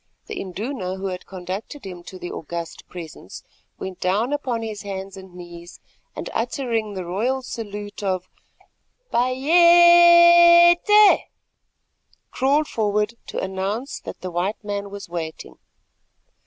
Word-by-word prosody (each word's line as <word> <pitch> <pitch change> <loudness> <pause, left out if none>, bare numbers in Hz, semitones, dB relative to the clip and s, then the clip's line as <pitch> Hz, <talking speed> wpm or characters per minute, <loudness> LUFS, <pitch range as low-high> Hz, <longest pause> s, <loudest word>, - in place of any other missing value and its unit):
The - - -6
Induna 190 0 -5
who 190 +1 -7
had 180 -1 -7
conducted 190 +8 -7
him 180 -2 -8
to 185 - -10
the 175 -1 -7
august 170 +1 -7
presence 165 - -10 0.3
went 190 -1 -7
down 210 +9 0
upon 250 -6 -2
his 215 -2 -6
hands 195 -1 -7
and 190 -2 -13
knees, 175 -1 -11 0.4
and, - - -6
uttering 230 -3 -2
the 185 -2 -5
royal 240 +9 -2
salute 205 -4 -7
of 185 -2 -2 0.9
Bayéte, 345 - +6 1.1
crawled 280 +4 +1
forward 210 0 -1
to - - -7
announce 195 +7 -4
that - - -10
the 185 - -6
white 185 +6 -3
man 200 -1 -4
was 200 0 -9
waiting. 165 -2 -7
205 Hz, 125 wpm, -22 LUFS, 185-265 Hz, 1.1 s, Bayéte